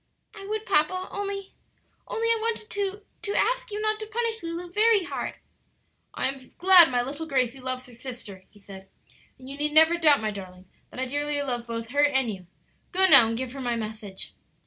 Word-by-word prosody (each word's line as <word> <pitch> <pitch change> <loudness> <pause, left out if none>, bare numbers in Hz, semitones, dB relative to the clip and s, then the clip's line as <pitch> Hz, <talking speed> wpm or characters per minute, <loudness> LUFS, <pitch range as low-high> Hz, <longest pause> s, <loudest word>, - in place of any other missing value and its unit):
"I 395 -2 -10
would, 430 +1 -3
papa, 370 0 +1
only 395 -1 -5 0.5
only 460 0 -2
I 460 -1 +3
wanted 450 -1 -3
to 405 0 -3 0.2
to 405 - -3
ask - - 0
you 420 0 -4
not 430 0 0
to 435 - -6
punish 455 0 -2
Lulu 340 +1 -5
very 425 0 +4
hard." - - -5 0.8
"I - - +1
am 265 -1 -6
glad 360 -2 +8
my 245 -1 0
little 290 +5 -6
Gracie 260 -2 0
loves 255 0 -4
her 250 - -15
sister," 235 -6 -8
he 205 - -21
said; 195 -1 -13 0.5
"and 260 - -14
you 275 +1 -8
need 300 0 0
never 320 +2 +5
doubt, 300 -4 +5
my 215 -1 -2
darling, 185 -2 -10 0.2
that - - -10
I 260 - 0
dearly 290 +2 -2
love 240 -3 -3
both 230 -1 -5
her 285 +3 +2
and 265 -5 +2
you. 185 -2 -12 0.4
Go 380 +1 +3
now 235 -10 +9
and 225 0 -2
give 255 0 -4
her 275 +1 -8
my 240 -2 -1
message." 215 -3 -6
290 Hz, 205 wpm, -26 LUFS, 240-395 Hz, 0.8 s, now